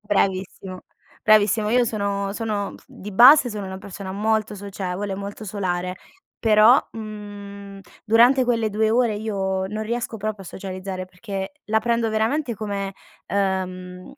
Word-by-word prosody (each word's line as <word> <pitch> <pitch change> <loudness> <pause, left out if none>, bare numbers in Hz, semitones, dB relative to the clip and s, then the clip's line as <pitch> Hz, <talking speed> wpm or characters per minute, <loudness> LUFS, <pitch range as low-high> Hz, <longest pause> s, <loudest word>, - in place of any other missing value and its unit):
Bravissimo, 190 -2 -1 0.4
bravissimo. 215 0 +4
Io 245 +1 +4
sono 200 -3 -2
sono 210 -2 -3
di 205 +2 -10
base, 250 +5 +8
sono 210 -2 -5
una 190 0 -6
persona 190 -1 -7
molto 215 +1 0
socievole, 195 -1 -4
molto 200 +2 -7
solare, 185 -3 -2 0.4
però, 220 +2 +6
mhmm, 205 -2 -8 0.2
durante 240 +4 +5
quelle 230 -3 +1
2 215 +1 +1
ore 235 -1 +2
io 190 -3 -2
non 215 +2 -4
riesco 235 +1 -3
proprio 215 -2 -4
a - - -12
socializzare, 185 -1 -6
perché 195 +2 -6
la 220 +1 +1
prendo 230 0 +1
veramente 235 +4 0
come 200 -2 -4 0.3
ehm, 185 +1 -2
205 Hz, 135 wpm, -23 LUFS, 190-220 Hz, 0.4 s, base